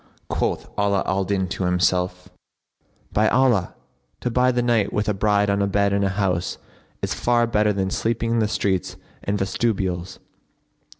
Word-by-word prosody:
Quoth - - -1
Ala 100 -1 +2
al 95 0 0
Din 95 -1 0
to 95 - -2
himself, 90 0 +1 0.9
"By 110 +1 +3
Allah, 120 -8 +2 0.5
to 125 - -1
bide 125 +1 +2
the 120 - +1
night 115 -4 +2
with 105 - -1
a 105 - +2
bride 105 +1 +2
on 100 0 +1
a 100 - +2
bed 100 0 +1
in 100 0 +1
a 100 - +2
house 95 -3 -1 0.5
is - - 0
far 120 -1 +2
better 105 -2 +2
than 95 -1 -1
sleeping 115 +2 -1
in 115 - +2
the 110 - +2
streets 95 -3 -1 0.3
and 100 +1 -1
vestibules!" 95 -3 -1
100 Hz, 170 wpm, -23 LUFS, 95-110 Hz, 0.9 s, By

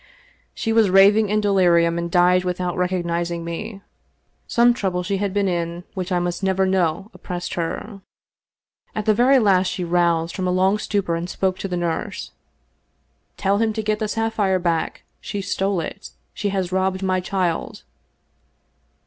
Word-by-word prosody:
She 225 - -1
was 220 -3 +4
raving 200 +3 +5
in 215 +1 +1
delirium, 175 -4 +3
and 170 0 -3
died 180 +1 +4
without 180 -1 -2
recognizing 175 -2 -1
me. 195 +4 -6 0.6
Some 240 +1 +4
trouble 185 -6 -2
she 195 +2 -1
had 200 0 -1
been 200 0 +1
in 170 -1 -2
which 185 0 -4
I 180 - +2
must 175 0 -2
never 190 0 +1
know 190 +1 0
oppressed 180 -1 -6
her. 195 +4 -4 0.9
At 215 - -2
the 215 - +4
very 250 +5 +4
last 190 -6 +3
she 185 - -3
roused 170 -1 +1
from 185 -2 -2
a - - +1
long 190 +3 +2
stupor 200 -5 -1
and 170 +2 -4
spoke 185 0 -1
to - - -3
the 180 -2 -3
nurse. 170 -2 -3 1.1
'Tell 200 +1 +1
him 225 -1 +1
to 220 0 -3
get 215 0 0
the 215 - -1
sapphire 220 -3 0
back 170 -3 -2
— - - -45
^she 200 -1 -4
stole 195 0 -1
it. - - -7 0.2
She 205 - -2
has 190 -2 -2
robbed 190 0 0
my 185 -1 +1
child.' 180 -2 -2
185 Hz, 170 wpm, -22 LUFS, 175-205 Hz, 1.1 s, raving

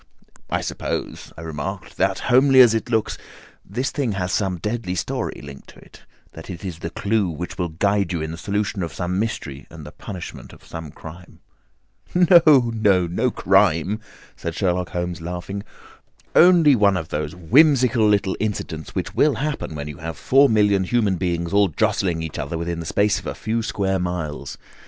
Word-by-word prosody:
"I - - 0
suppose," - - -4
I - - -8
remarked, 80 +4 -6
"that, - - +1
homely 130 +2 +5
as 120 -3 +7
it 115 +2 -2
looks, 110 -2 0 0.4
this 125 +8 -3
thing 135 -7 -1
has 90 -2 -2
some 95 -3 0
deadly 105 0 -3
story 85 - -3
linked 70 -1 -11
on - - -17
to - - -17
it—that 80 - -16
it 90 +1 -7
is 85 -4 -6
the 85 - -4
clue 100 0 0
which 85 +2 -6
will 90 -1 -1
guide 100 +3 0
you 85 - -1
in 80 0 -4
the 80 - -7
solution 100 0 -2
of 85 - -4
some 90 +1 -2
mystery 75 -11 -4
and 80 -2 -11
the 75 - -9
punishment 90 0 -9
of - - -17
some 80 -2 -8
crime." 85 +4 -12 0.7
"No, 160 -8 +6
no. 100 -5 +3
No 110 +9 0
crime," 95 -2 +2 0.4
said 85 -1 -5
Sherlock 90 -2 0
Holmes, 90 0 -4
laughing. 90 +4 -5 0.7
"Only 170 -5 +6
one 100 -4 +3
of 80 -3 -5
those 75 +1 -3
whimsical 125 - +4
little 100 -2 +1
incidents 90 -7 -4
which - - -3
will 150 -2 +3
happen 145 - -3
when 75 0 -5
you 75 -2 -8
have 80 0 -6
four 135 +1 +4
million 105 -3 +3
human 105 -2 +1
beings 85 0 -2
all 100 0 +5
jostling 85 0 0
each 80 - -6
other 80 +4 -3
within 85 0 -3
the 85 - -6
space 100 +2 +2
of - - -9
a - - -4
few 115 +1 -2
square 95 -3 -1
miles. 85 -5 -4
95 Hz, 185 wpm, -22 LUFS, 85-110 Hz, 0.7 s, as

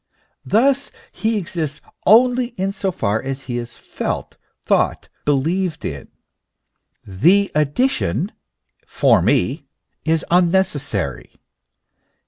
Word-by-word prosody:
Thus 270 +6 +2 0.2
he 220 0 -1
exists 165 -6 -3 0.3
only 245 +3 +4
in 190 +1 -1
so 195 -1 -2
far 110 - -1
as 135 +1 -5
he 120 -2 -3
is 120 0 -8
felt, - - -5 0.3
thought, - - +1 0.2
believed 160 +5 0
in; 70 -2 -5 1.0
the 175 - +3
addition 150 - 0 0.3
" - - -44
for - - +5
me" - - +1 0.4
is 160 -1 0
unnecessary. 165 - 0
170 Hz, 105 wpm, -20 LUFS, 135-200 Hz, 1.0 s, for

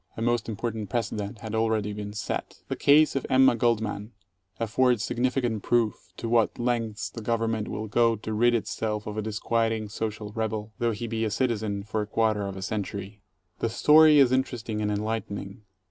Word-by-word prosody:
A - - -4
most 120 -1 0
important 110 -1 -4
precedent 105 -2 -3
had 110 -1 -6
already 110 -2 0
been 105 0 -5
set. 105 - -5
The - - -1
case 150 +1 +5
of 135 - 0
Emma 130 -1 +5
Goldman 110 -2 -1 0.5
affords 120 0 +2
significant 120 -3 0
proof 110 -8 0
to 115 - -4
what 115 -1 +2
lengths 115 -3 -1
the 115 - -8
19 - - -12
Government 115 -2 0
will 110 +1 -4
go 115 +1 +3
to 110 +1 -5
rid 120 +2 +3
itself 105 -1 -2
of 105 - -5
a 110 - -1
disquieting 110 0 -1
social 105 -1 -4
rebel, 110 -1 -3
though 120 - +2
he 115 +1 -3
be 115 -1 -2
a 110 - +1
citizen 110 -3 -1
for 110 +1 -2
a 105 - -4
quarter 110 -2 +1
of 95 -1 -6
a 95 - -5
century. 100 0 -4 0.4
The 115 - 0
story 150 +6 +6
is 135 -3 +6
interesting 120 -4 -1
and 105 - 0
enlightening. 105 -1 -4
110 Hz, 185 wpm, -27 LUFS, 105-120 Hz, 0.5 s, story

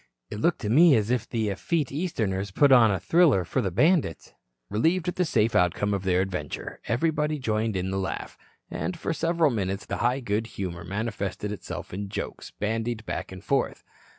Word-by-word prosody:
"It 105 - -5
looked 170 +9 +1
to 105 - -2
me 155 +3 +7
as 110 0 +1
if 120 -2 -1
the 110 -3 -1
effete 150 - -1
Easterners 110 - -2
put 140 +8 +4
on 120 -4 +7
the 95 -2 0
thriller 140 - +4
for 130 - 0
the 100 - -1
bandits." 145 - +1 0.3
Relieved 165 - +1
at 180 - -1
the 180 - +1
safe 115 -6 +2
outcome 90 +4 +2
of 100 -1 -2
their 90 -1 +3
adventure, 90 -7 -4
everybody 150 +5 +1
joined 110 -4 -1
in 95 +1 -2
the 95 - -1
laugh, 95 - -4 0.4
and 185 - -3
for 165 - -2
several 165 -2 +2
minutes 100 -3 -2
the - - -3
high 125 +3 +1
good 110 -2 -1
humor 85 -3 -4
manifested 100 0 -3
itself 105 - -7
in 100 +1 -4
jokes - - -5
bandied 115 +1 -3
back 95 -3 -4
and 95 -1 -9
forth. - - 0
110 Hz, 190 wpm, -26 LUFS, 95-145 Hz, 0.4 s, me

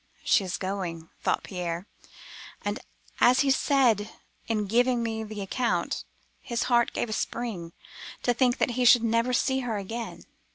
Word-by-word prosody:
'She 225 -3 +4
is 185 - -3
going,' 180 -4 -4
thought - - 0
Pierre, 175 -1 -4 0.8
and - - -1 0.4
(as 250 +2 +6
he 275 -1 +3
said 245 -7 +3 0.4
in 215 -2 0
giving 240 +3 +2
me 220 -1 -2
the 215 -1 -6
account) 235 +5 -1 0.4
his 235 -2 -2
heart 240 -1 +3
gave - - -2
a 215 - -3
spring, 215 -8 -3 0.5
to 245 - +3
think 245 0 +2
that - - +1
he 250 +1 0
should 245 -1 +7
never 230 +2 +2
see 265 +2 +2
her 240 -4 -2
again. 225 +4 -6
230 Hz, 160 wpm, -27 LUFS, 200-245 Hz, 0.8 s, should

